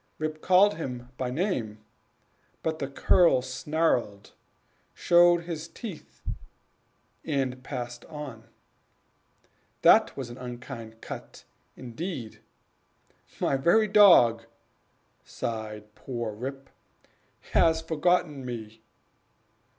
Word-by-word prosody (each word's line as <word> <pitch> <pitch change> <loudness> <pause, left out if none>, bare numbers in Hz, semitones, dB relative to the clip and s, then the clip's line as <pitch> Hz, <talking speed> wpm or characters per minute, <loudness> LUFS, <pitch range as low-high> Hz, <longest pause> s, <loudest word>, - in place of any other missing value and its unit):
Rip 155 0 -4
called 190 +1 +4
him 125 -5 -6
by 125 -1 -3
name, 125 - -2 0.9
but 160 -1 -2
the 140 - -2
cur 140 +2 +4
snarled, 130 -6 -1 0.6
showed 175 0 +5
his 165 -2 -5
teeth, 175 -5 -10 1.0
and 130 -4 -2
passed 120 -3 -6
on. 145 -8 -8 1.4
This - - +6
was 130 -3 -5
an 120 - -10
unkind 120 -2 -8
cut - - -9 0.3
indeed 130 - -6 1.0
"My - - +1
very 195 +10 +4
dog," 170 - +6 0.8
sighed 105 -2 -6
poor 120 -2 -5
Rip, 135 +4 -7 0.8
"has 160 -1 +4
forgotten 160 -3 0
me!" 110 -3 -7
135 Hz, 90 wpm, -27 LUFS, 120-165 Hz, 1.4 s, This